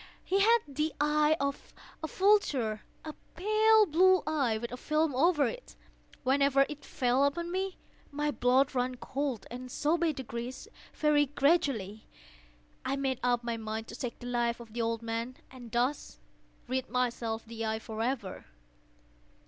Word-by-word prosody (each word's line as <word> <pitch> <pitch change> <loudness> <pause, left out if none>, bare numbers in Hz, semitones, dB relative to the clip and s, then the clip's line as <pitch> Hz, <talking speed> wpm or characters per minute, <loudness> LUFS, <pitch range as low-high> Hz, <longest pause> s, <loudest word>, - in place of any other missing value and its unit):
He 390 - +1
had 460 +3 +5
the 300 +2 -2
eye 300 +1 +3
of 280 0 -3 0.3
a - - -1
vulture—a 305 - 0 0.2
pale 430 +3 +4
blue 370 +2 +4
eye, 275 -8 +1
with 235 +1 -5
a - - -4
film 305 +2 0
over 300 +2 +3
it. - - -6 0.5
Whenever 275 +1 +4
it 295 -1 -8
fell 250 +2 +1
upon 340 +5 0
me, 380 +1 -2 0.3
my 295 +1 -1
blood 260 +1 +2
ran 250 0 0
cold; 265 -3 -3
and 250 +1 -7
so 310 +6 0
by 335 -1 +2
degrees—very 265 +4 -2
gradually—I 190 - -2
made 270 -2 -1
up 245 -1 +1
my 235 -1 -2
mind 220 0 -5
to 230 - -7
take 245 -1 -5
the 245 - -11
life 240 -1 0
of 230 -2 -12
the 235 - -2
old 230 0 -1
man, 230 +2 -3
and 245 -3 -11
thus 245 +5 -1 0.5
rid 260 +1 -2
myself 235 -2 -1
of 230 - -21
the 225 -1 -5
eye 220 0 -1
forever. 225 -1 -4
260 Hz, 150 wpm, -30 LUFS, 235-300 Hz, 0.5 s, had